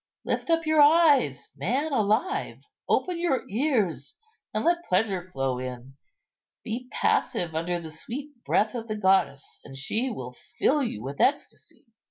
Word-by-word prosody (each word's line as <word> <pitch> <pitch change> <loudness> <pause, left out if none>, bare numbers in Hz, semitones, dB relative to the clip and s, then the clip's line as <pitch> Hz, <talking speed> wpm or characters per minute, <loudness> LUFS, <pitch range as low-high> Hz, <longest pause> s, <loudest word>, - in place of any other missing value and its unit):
Lift - - -2
up 330 -1 +2
your 310 -1 +4
eyes, 290 - +4
man 255 - -1
alive, 245 - 0 0.3
open 360 -2 +1
your 340 -7 0
ears, 205 - -1 0.3
and - - -2
let 345 0 +2
pleasure 185 - 0
flow 135 -5 -2
in. 125 +1 -7 0.7
Be 240 +3 -5
passive 170 -2 0
under 170 +2 -1
the 160 -2 -8
sweet 260 - -6
breath 215 +1 +1
of 230 -2 -5
the 215 - -3
goddess, 190 -8 +1
and 135 -1 -10
she 220 - -1
will 125 - -7 0.2
fill 295 +1 +3
you 110 - -3
with 140 +2 -4
ecstasy." 285 - -1
215 Hz, 150 wpm, -26 LUFS, -, 0.7 s, your